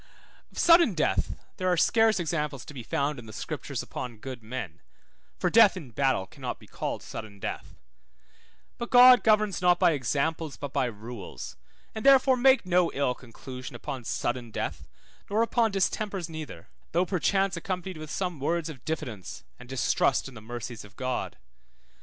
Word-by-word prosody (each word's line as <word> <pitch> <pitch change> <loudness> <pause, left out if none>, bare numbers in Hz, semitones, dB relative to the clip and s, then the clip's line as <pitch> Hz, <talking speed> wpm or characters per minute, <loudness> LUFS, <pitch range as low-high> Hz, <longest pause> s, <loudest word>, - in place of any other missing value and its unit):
Of - - -16
sudden 335 - +6
death 155 - 0 0.2
there 185 - -1
are 180 - +2
scarce 225 +1 +4
examples 150 -5 -2
be 140 -4 -8
found 140 +4 -1
in 115 - -11
the - - -9
Scriptures - - -5
upon 120 -3 -6
good 130 +1 -7
men, 110 -7 -6 0.6
for - - 0
death 220 -4 +7
in 145 -9 -9
battle 130 -5 +1
cannot - - -6
be - - -16
called - - -4
sudden 110 -2 -8
death; - - -5 1.0
but 235 - -4
God 250 0 +8
governs 215 -4 +3
not 180 -1 +5
by - - +4
examples 150 +3 -1
but 145 -2 -6
by 135 -2 +2
rules, 110 -2 -7 0.4
and 220 - -5
therefore 270 -1 +6
make 260 -2 +4
no 180 -1 +3
ill 140 -2 +1
conclusion 125 +1 -9
upon 130 -3 -6
sudden 120 +1 -2
death - - -4 0.4
nor 215 +3 +2
upon 230 -1 +2
distempers 195 -1 -1
neither, 155 - -8 0.3
though 175 +2 +3
perchance 195 +1 +1
accompanied 185 0 -4
with 155 -1 -8
some 180 -2 -3
words 165 +3 -1
of 135 -6 -10
diffidence 130 - -5 0.2
and 125 0 -13
distrust 130 +1 +1
in 135 - -11
the 110 - -10
mercies 120 +1 -6
of 105 +1 -16
God. 130 -1 -3
155 Hz, 165 wpm, -28 LUFS, 125-195 Hz, 1.0 s, God